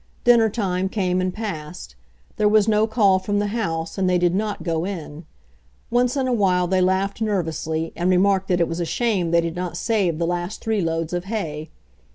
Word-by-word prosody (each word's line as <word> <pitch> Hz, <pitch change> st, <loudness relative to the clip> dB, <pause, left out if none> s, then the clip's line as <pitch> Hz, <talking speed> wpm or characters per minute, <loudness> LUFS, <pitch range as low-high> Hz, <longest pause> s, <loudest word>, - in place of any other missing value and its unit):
Dinner 235 Hz, -2 st, +5 dB
time 190 Hz, -3 st, -1 dB
came 185 Hz, -3 st, 0 dB
and 185 Hz, 0 st, -1 dB
passed. 180 Hz, -, -6 dB, 0.4 s
There 210 Hz, -1 st, +3 dB
was 215 Hz, 0 st, +4 dB
no 215 Hz, 0 st, +3 dB
call 205 Hz, -4 st, +3 dB
from 205 Hz, +2 st, -2 dB
the 205 Hz, 0 st, 0 dB
house, 165 Hz, -6 st, -3 dB
and 185 Hz, -1 st, +2 dB
they 180 Hz, -, +3 dB
did 175 Hz, 0 st, +2 dB
not 205 Hz, -2 st, -2 dB
go 165 Hz, -1 st, -1 dB
in. 165 Hz, -4 st, -6 dB, 0.7 s
Once 245 Hz, +2 st, +2 dB
in 265 Hz, -1 st, 0 dB
a 255 Hz, -, +1 dB
while 185 Hz, -5 st, +2 dB
they 185 Hz, +1 st, +1 dB
laughed 190 Hz, +3 st, 0 dB
nervously, 165 Hz, -6 st, -2 dB
and 175 Hz, +2 st, 0 dB
remarked 190 Hz, +1 st, +3 dB
that 180 Hz, -1 st, +1 dB
it 170 Hz, -, +2 dB
was 165 Hz, +1 st, -4 dB
a -, -, 0 dB
shame 185 Hz, 0 st, 0 dB
they 170 Hz, 0 st, +3 dB
did 165 Hz, -1 st, -4 dB
not 180 Hz, -1 st, -4 dB
save 190 Hz, -6 st, 0 dB
the 170 Hz, -, 0 dB
last 175 Hz, +4 st, -3 dB
three 220 Hz, -2 st, -1 dB
loads 165 Hz, 0 st, -2 dB
of 175 Hz, 0 st, -2 dB
hay. 160 Hz, -8 st, -4 dB
185 Hz, 210 wpm, -22 LUFS, 170-210 Hz, 0.7 s, Dinner